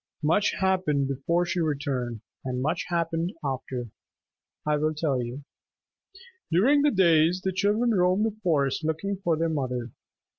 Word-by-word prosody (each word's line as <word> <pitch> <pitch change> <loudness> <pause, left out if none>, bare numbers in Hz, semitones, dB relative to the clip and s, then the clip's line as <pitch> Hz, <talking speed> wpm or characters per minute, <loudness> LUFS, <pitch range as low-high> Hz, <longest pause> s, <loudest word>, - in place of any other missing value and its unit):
Much 165 +7 +2
happened 185 -8 +1
before 170 +6 0
she 175 +1 -2
returned, 135 -7 -2 0.2
and 130 -2 -3
much 155 +7 -1
happened 170 +1 -1
after. 130 -3 -4 0.8
I 150 0 +2
will 155 +1 0
tell 145 -5 0
you. 120 +4 -6 1.1
During 255 - +4
the 295 - +4
days 175 - +4
the 190 - -1
children 210 +5 +2
roamed 185 +1 +3
the 220 -2 -2
forest 145 -5 +1
looking 160 +6 -2
for 170 -4 0
their 165 +1 +1
mother. 125 -6 -2
160 Hz, 145 wpm, -26 LUFS, 140-185 Hz, 1.1 s, During